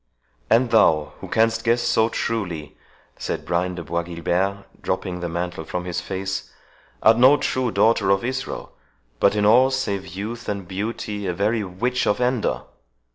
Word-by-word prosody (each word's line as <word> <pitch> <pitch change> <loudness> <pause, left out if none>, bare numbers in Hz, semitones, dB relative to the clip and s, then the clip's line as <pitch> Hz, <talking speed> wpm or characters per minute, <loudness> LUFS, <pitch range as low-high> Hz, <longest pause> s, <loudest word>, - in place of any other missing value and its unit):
"And 115 +2 +4
thou, 80 -9 +4
who - - -7
canst 115 0 +2
guess 120 +1 +3
so 115 -1 +3
truly," 90 -13 -3 0.4
said - - -3
Brian 90 +1 0
de 85 - -6
Bois 85 +2 -1
Guilbert, 90 +4 -2 0.2
dropping 90 -1 -2
the 85 -1 -3
mantle 85 0 -3
from 90 +3 -4
his 90 0 -3
face, 95 +1 -4 0.5
"art 110 +1 +6
no 130 +4 +7
true 130 -3 0
daughter 110 -3 +3
of 100 +3 +2
Israel, 130 +1 -4 0.5
but 100 - +4
in 105 -1 +2
all, 125 +5 +6
save 100 -8 -2
youth 105 +7 -6
and 100 -3 -4
beauty, 105 +1 -4
a 90 - 0
very 105 +4 +1
witch 120 +7 -1
of 105 - +2
Endor. 125 -2 0
100 Hz, 165 wpm, -23 LUFS, 90-115 Hz, 0.5 s, no